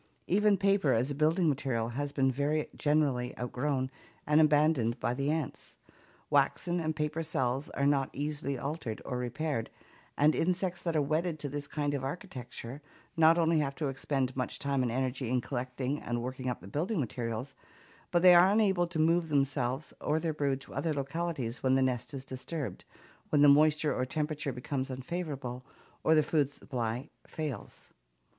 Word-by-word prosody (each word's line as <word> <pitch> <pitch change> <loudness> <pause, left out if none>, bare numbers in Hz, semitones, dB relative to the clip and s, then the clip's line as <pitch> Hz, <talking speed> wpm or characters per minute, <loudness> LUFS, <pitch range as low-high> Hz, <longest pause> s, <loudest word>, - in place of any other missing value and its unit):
Even 205 +2 +3
paper 195 -7 +3
as 125 +5 +1
a - - -1
building 160 +4 +2
material 130 -5 0
has 140 +4 -3
been 135 -2 +2
very 145 +3 0
generally 140 -5 +1
outgrown 130 +2 -1 0.3
and 150 +1 +5
abandoned 150 -6 +3
by 120 - 0
the 140 +3 -1
ants. 155 -3 -3 0.5
Waxen 175 0 +2
and 155 -1 -1
paper 150 +1 -1
cells 135 -3 -1
are 140 - -1
not 140 -2 +2
easily 145 -1 -3
altered 135 -4 -4
or 125 -2 -3
repaired, 125 0 -2 0.5
and 150 +2 +5
insects 180 0 0
that 170 -2 -2
are 150 - +3
wedded 155 +3 0
to 145 -1 -4
this 145 +1 -4
kind 145 -1 -1
of 140 -2 -2
architecture, 135 - -6 0.3
not 165 +1 +6
only 165 -1 +3
have 140 -2 -1
to 150 -1 -1
expend 135 -1 -1
much 125 -1 -2
time 140 -1 0
and 125 -2 0
energy 130 0 -1
in 125 +1 +2
collecting 130 +2 -3
and 120 0 -2
working 130 0 -3
up 125 - -4
their 95 - -10
building 175 - -1
materials, 120 0 -3 0.6
but 175 0 +2
they 180 -1 +9
are 175 +2 +7
unable 195 -4 +3
to 170 -1 -5
move 165 +1 +3
themselves 135 -1 0
or 155 - +1
their 160 -1 -1
brood 140 -3 0
to - - -11
other 160 -2 -1
localities 140 -3 -3
when 130 0 +3
the 135 - +3
nest 125 -1 -1
is 135 -2 -6
disturbed, 135 +2 -5 0.4
when 145 -1 +4
the - - +8
moisture 150 +1 +5
or 125 - -1
temperature 150 +1 -2
become 130 +2 -3
unfavorable 130 -2 -4 0.4
or 160 - +5
the 155 - +5
food 145 -2 +1
supply 125 -2 -4 0.2
fails. 155 -5 -6
145 Hz, 175 wpm, -31 LUFS, 130-155 Hz, 0.6 s, they